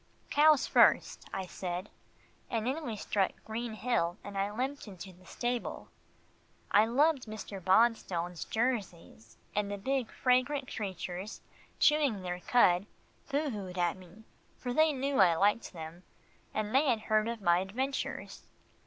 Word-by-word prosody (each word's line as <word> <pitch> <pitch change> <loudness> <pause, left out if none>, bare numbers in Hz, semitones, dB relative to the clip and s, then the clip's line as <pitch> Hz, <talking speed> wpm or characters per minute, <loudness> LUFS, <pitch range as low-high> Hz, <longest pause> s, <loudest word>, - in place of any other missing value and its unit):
"Cows 300 -1 +5
first," - - +4
I 190 - -3
said 180 +1 -5 0.6
when 255 +7 -2
we 225 - -3
struck 200 -1 0
Green 225 +1 -4
Hill, 210 -7 0
and 200 - -8
I 195 +1 0
limped 260 +4 -3
into 190 -1 -9
the 185 +1 -20
stable. 240 -1 -3 0.8
I 210 +2 +5
loved 275 +2 +2
Mr. 205 -3 -7
Bonstone's 185 -4 +2
Jerseys, 195 - -3 0.2
and 205 -1 0
the 205 - -3
big 260 +3 -1
fragrant 260 +2 +1
creatures, 190 0 -5 0.4
chewing 285 -10 +3
their 180 0 -3
cud, 185 -3 +3 0.4
boo 290 0 0
hooed 190 -4 -6
at 175 -1 +1
me, 185 +3 -15 0.3
for 245 - -4
they 315 +3 +4
knew 275 0 -1
I 175 -4 +6
liked 205 +6 +2
them, 165 0 -9 0.5
and 215 0 -3
they 275 +2 +4
had 225 -3 +1
heard 215 0 +1
of 235 -1 -3
my 175 -3 +3
adventures. 255 +9 -4
215 Hz, 145 wpm, -31 LUFS, 185-255 Hz, 0.8 s, I